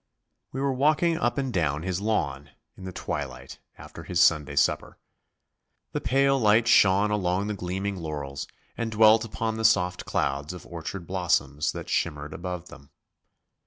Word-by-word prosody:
We 135 - -5
were 140 -1 +1
walking 155 +5 +2
up 120 +2 0
and 135 -3 -2
down 80 -4 0
his 95 +1 -2
lawn, 70 -10 -1 0.3
in 95 - -11
the 95 - -5
twilight, - - -6 0.2
after - - -11
his 90 - -2
Sunday 75 -5 +3
supper. - - +1 0.9
The - - -3
pale 135 +1 +2
light 110 +1 +4
shone 100 +1 +5
along 95 -1 0
the 105 - -2
gleaming 95 +1 -3
laurels 75 -4 -5 0.3
and 115 -1 -3
dwelt 110 0 +6
upon 110 0 -3
the 110 - -3
soft 90 -5 +2
clouds 70 +4 -1
of 90 - -10
orchard 85 +2 -7
blossoms 75 -5 0
that - - -7
shimmered 75 -2 -2
above 90 -1 -6
them. 70 -1 -14
95 Hz, 160 wpm, -26 LUFS, 80-110 Hz, 0.9 s, dwelt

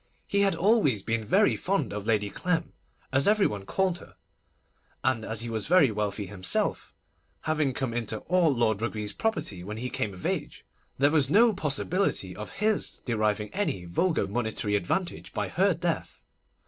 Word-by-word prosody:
He 200 - 0
had 195 -1 +3
always 185 - +3
been 110 +1 -1
very 200 - +3
fond 180 - -1
of 105 +1 -5
Lady 105 -3 +1
Clem, 170 -2 -1 0.4
as 140 +1 +3
every 210 -1 +4
one 100 -2 -3
called 190 -2 0
her, - - -15 0.9
and 130 -4 +1
as 110 0 -4
he 120 - -4
was 110 -2 -2
very 165 -7 +5
wealthy 105 -1 -2
himself, 95 -1 -1 0.5
having 155 -3 +1
come 130 -2 -3
into 115 -2 -2
all 180 -3 +3
Lord 110 -5 +1
Rugby's 105 -3 -2
property 155 - -2
when 105 +3 -6
he 125 +2 -4
came 100 -3 -2
of 90 - -10
age, - - -3 0.3
there 140 +2 +4
was 145 -4 +3
no 225 +6 +5
possibility 150 - -1
of 105 - -8
his 215 0 -1
deriving 110 -3 0
any 185 - -1
vulgar 105 - +1
monetary 110 0 -1
advantage 165 - -2
by - - -2
her 190 0 +2
death. 170 0 -3
125 Hz, 170 wpm, -28 LUFS, -, 0.9 s, very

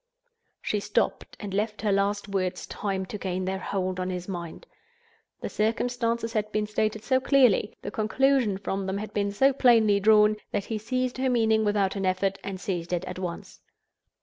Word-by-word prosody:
She 210 - 0
stopped, 205 +1 -1
and 205 -3 -6
left 210 +2 -2
her 210 - +2
last 200 +1 0
words 185 -2 -2
time 195 -2 -3
to 210 +2 -7
gain 185 -1 -2
their 190 0 -2
hold 185 -1 -2
on 185 0 -2
his 180 -1 -4
mind. 175 - -6 0.8
The - - -3
circumstances 230 +1 -1
had 215 -2 -1
been 215 0 0
stated 215 0 -1
so 260 -1 +2
clearly, 255 -6 +3
the - - -4
conclusion 245 -1 +2
from 195 0 -3
them 190 +1 -2
had 215 +1 -6
been 200 -1 0
so 270 +7 +3
plainly 225 -6 +4
drawn, 210 +1 +5
that 200 - -2
he 220 -2 -3
seized 255 +3 -2
her 260 0 +1
meaning 220 -3 +3
without 205 -2 +1
an 195 -1 -1
effort, 195 +1 0
and 195 -1 -5
seized 180 -3 -3
it 175 +1 -1
at 185 - -6
once. 175 -2 -6
205 Hz, 185 wpm, -27 LUFS, 190-225 Hz, 0.8 s, drawn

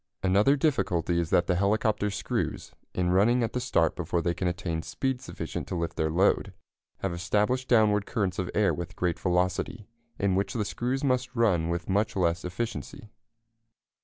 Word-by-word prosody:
Another 100 +9 +4
difficulty 90 - +1
is 85 -2 -1
that 85 - +3
the 90 - +1
helicopter 105 +3 +1
screws, 95 - -3 0.2
in 90 -1 +1
running 115 +7 +4
at 115 - -2
the 125 - 0
start 100 -11 +1
before 85 0 -1
they 85 +1 0
can 90 - -2
attain 85 -2 -2
speed 130 +7 -2
sufficient 130 - -6
to - - -3
lift 85 -1 -2
their 80 - 0
load, 90 +5 +2 0.5
have 95 -2 -1
established 105 +9 0
downward 105 -3 +3
currents 95 -5 -1
of 90 - -2
air 105 -2 +3
with 85 -1 -6
great 90 -2 -1
velocity, 90 +4 0 0.3
in 100 -1 +1
which 100 +6 0
the 110 -4 -1
screws 125 +7 -2
must 130 -2 0
run 95 -9 +2
with 85 0 -2
much 100 +3 +1
less 85 -2 +1
efficiency. 110 +2 -5
95 Hz, 175 wpm, -28 LUFS, 90-115 Hz, 0.5 s, Another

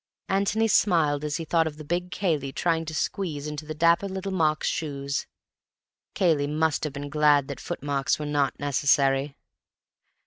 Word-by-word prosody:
Antony 200 +3 +2
smiled 160 -9 +2
as 150 -1 -2
he 165 - -5
thought 165 0 +2
of 150 -1 -6
the 155 - -8
big 175 +4 -2
Cayley 155 -9 -1
trying 165 +2 0
to 160 - -6
squeeze 150 -3 -2
into 150 0 -6
the 155 - -5
dapper 170 +5 +3
little 190 +1 -4
Mark's 155 -4 +1
shoes. 140 -3 -3 0.9
Cayley 160 -7 +2
must 155 +1 0
have 150 - -4
been 145 0 -5
glad 150 -2 +4
that 140 - -6
footmarks 140 -1 -1
were 150 - -5
not 145 -2 0
necessary. 140 0 +2
150 Hz, 165 wpm, -26 LUFS, 145-170 Hz, 0.9 s, glad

